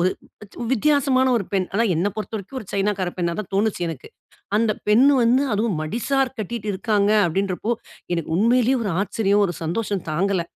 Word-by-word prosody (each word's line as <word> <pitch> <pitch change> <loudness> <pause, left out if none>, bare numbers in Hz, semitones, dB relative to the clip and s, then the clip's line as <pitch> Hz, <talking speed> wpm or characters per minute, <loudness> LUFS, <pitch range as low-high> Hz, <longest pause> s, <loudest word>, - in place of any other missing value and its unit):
ஒரு 185 +2 +3 0.6
வித்தியாசமா 275 0 +3 0.2
ஒரு 195 - -4
பெண். 190 -2 +1
ஆனா 230 +3 +3
என்ன 185 +5 +1
பொறுத்த 215 +1 -5
வரைக்கும், 215 +7 -7
ஒரு 200 - -11
சைனாக்கார 195 -2 0
பெண்ணாதான் 175 +3 -2
தோணுச்சு, 200 -3 0
எனக்கு. 155 -5 -7 0.5
அந்த 225 -1 +2 0.2
பெண்ணு 255 +7 +6
வந்து 250 +4 +4
அதுவும், 205 -6 0
மடிசார் 260 - -1
கட்டிட்டு 215 +1 -5
இருக்காங்க, 205 +1 +1 0.2
அப்படின்றப்போ, 195 +6 -1 0.4
எனக்கு 165 -1 -3
உண்மையிலேயே 245 +3 +3
ஒரு 195 - -1
ஆச்சரியம்! 205 0 +1
ஒரு 175 - -4
சந்தோஷம் 200 +2 -2
தாங்கல. 185 +1 0
205 Hz, 160 wpm, -22 LUFS, 185-235 Hz, 0.6 s, பெண்ணு